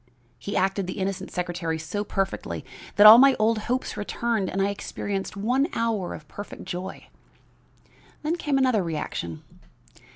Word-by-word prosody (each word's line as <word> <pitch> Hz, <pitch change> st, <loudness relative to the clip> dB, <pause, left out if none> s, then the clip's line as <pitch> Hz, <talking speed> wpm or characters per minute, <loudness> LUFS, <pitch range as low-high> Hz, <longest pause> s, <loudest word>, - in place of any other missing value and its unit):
he 200 Hz, -, -3 dB
acted 190 Hz, 0 st, 0 dB
the 185 Hz, -, -5 dB
innocent 190 Hz, -1 st, -3 dB
secretary 175 Hz, -2 st, -3 dB
so 160 Hz, +6 st, -3 dB
perfectly 195 Hz, -1 st, -3 dB, 0.3 s
that 205 Hz, -, +7 dB
all 220 Hz, +2 st, +12 dB
my 275 Hz, 0 st, +7 dB
old 220 Hz, +1 st, +2 dB
hopes 255 Hz, +1 st, -1 dB
returned 215 Hz, -1 st, -1 dB
and 195 Hz, -, -3 dB
I 195 Hz, +1 st, +2 dB
experienced 200 Hz, 0 st, -4 dB
one 250 Hz, +8 st, +1 dB
hour 225 Hz, -6 st, -1 dB
of 150 Hz, -, -12 dB
perfect 205 Hz, +6 st, -9 dB
joy. 185 Hz, +2 st, -6 dB, 1.2 s
Then 310 Hz, +3 st, 0 dB
came 295 Hz, -5 st, 0 dB
another 255 Hz, -6 st, +3 dB
reaction. 150 Hz, -, -4 dB
200 Hz, 150 wpm, -25 LUFS, 185-230 Hz, 1.2 s, all